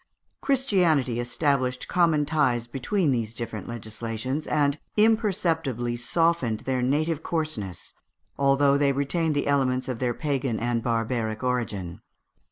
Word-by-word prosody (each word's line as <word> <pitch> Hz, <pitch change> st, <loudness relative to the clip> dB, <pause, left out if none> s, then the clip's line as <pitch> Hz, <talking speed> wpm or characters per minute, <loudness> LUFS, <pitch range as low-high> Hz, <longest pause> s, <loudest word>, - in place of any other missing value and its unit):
Christianity 180 Hz, -, +2 dB
established 125 Hz, 0 st, 0 dB
common 165 Hz, -4 st, +2 dB
ties 140 Hz, -6 st, +1 dB
between 145 Hz, -, 0 dB
these 115 Hz, -3 st, -2 dB
different 110 Hz, -4 st, -5 dB
legislations, 115 Hz, +5 st, -4 dB
and 145 Hz, -1 st, +1 dB, 0.2 s
imperceptibly 175 Hz, -, +1 dB
softened 125 Hz, -2 st, +1 dB
their 130 Hz, -1 st, -1 dB
native 150 Hz, +5 st, 0 dB
coarseness, 155 Hz, -, -3 dB, 0.4 s
although 140 Hz, 0 st, +3 dB
they 140 Hz, -1 st, +3 dB
retained 150 Hz, +3 st, 0 dB
the 145 Hz, -, 0 dB
elements 130 Hz, -2 st, +1 dB
of 125 Hz, -3 st, -3 dB
their 125 Hz, -2 st, 0 dB
pagan 135 Hz, -6 st, -1 dB
and 120 Hz, 0 st, 0 dB
barbaric 115 Hz, -1 st, -1 dB
origin. 110 Hz, -9 st, -2 dB
135 Hz, 120 wpm, -26 LUFS, 120-155 Hz, 0.4 s, although